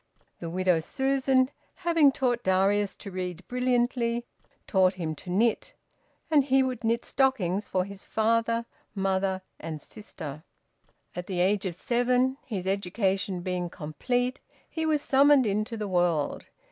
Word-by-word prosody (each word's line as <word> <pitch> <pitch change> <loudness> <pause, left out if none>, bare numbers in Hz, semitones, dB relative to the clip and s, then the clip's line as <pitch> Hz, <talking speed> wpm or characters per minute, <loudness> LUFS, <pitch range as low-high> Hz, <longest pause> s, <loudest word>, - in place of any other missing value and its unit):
The 165 - -5
widow 180 -1 +2
Susan, 265 - +1 0.2
having 330 -5 +4
taught 245 -2 0
Darius 195 +1 +2
to 200 - -9
read 180 -1 -5
brilliantly, 245 -1 0 0.4
taught 190 -1 +3
him 165 -4 -3
to 180 - -10
knit, 230 - +1 0.6
and 295 -3 +5
he 270 0 +3
would 255 -3 -3
knit 230 +1 0
stockings 210 -8 +1
for 185 -1 0
his 200 0 -10
father, 230 +1 +1 0.3
mother, 190 -1 0 0.2
and 155 -2 -5
sister. 155 -5 -9 0.7
At 180 0 -5
the 185 -2 -2
age 195 +2 +2
of 175 - -4
seven, 250 +5 +1
his 195 -6 -4
education 195 -1 -1
being 180 -1 -2
complete, 245 - -2 0.3
he 320 -1 -3
was 300 -2 +1
summoned 280 -1 +5
into 215 +3 -1
the 210 -1 -3
world. 175 -5 0
210 Hz, 140 wpm, -27 LUFS, 185-250 Hz, 0.7 s, and